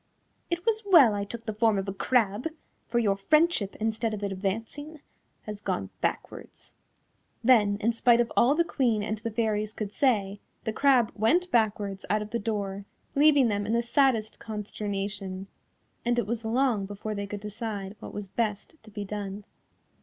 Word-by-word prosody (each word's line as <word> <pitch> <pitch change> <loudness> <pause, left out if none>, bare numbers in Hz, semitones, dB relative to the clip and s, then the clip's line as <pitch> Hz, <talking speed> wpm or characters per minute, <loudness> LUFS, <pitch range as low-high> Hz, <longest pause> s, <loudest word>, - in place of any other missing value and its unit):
It 345 +2 -2
was 445 -1 +2
well 335 - +7
I 200 0 -1
took 230 +2 -8
the 220 - -3
form 220 -1 +2
of 195 0 -2
a 195 - -2
crab, 220 +2 +1 0.4
for 235 - -1
your 210 -4 +3
friendship 300 - +2
instead 220 0 -1
of 205 - -7
advancing 220 +11 -4 0.4
has 210 -1 -7
gone 95 - -2
backwards." - - -4 0.7
Then 215 -5 +5
in 230 +3 +2
spite 235 +1 +4
of 240 - +1
all 260 +5 +5
the 340 - +3
Queen 240 -10 0
and 215 0 -3
the 230 +1 -3
Fairies 215 -1 -1
could 210 -3 -4
say, 205 -6 +1 0.2
the 220 - -2
crab 255 -3 +4
went 340 - +2
backwards 205 -4 +1
out 210 +1 +1
of 210 - -11
the 235 - -1
door, 200 -2 -3 0.3
leaving 285 -2 +5
them 205 -1 -1
in 220 - 0
the 235 0 +2
saddest 235 -3 +1
consternation, 200 -2 -4 0.6
and 240 0 +1
it 240 - +1
was 230 +2 -3
long 225 -3 +1
before 205 +2 -5
they 200 -1 -4
could 205 0 -6
decide 210 -2 -5
what - - -8
was 205 -1 -5
best 210 - -2
to 215 - -15
be 205 -1 -6
done. 205 0 -5
215 Hz, 175 wpm, -27 LUFS, 205-235 Hz, 0.7 s, well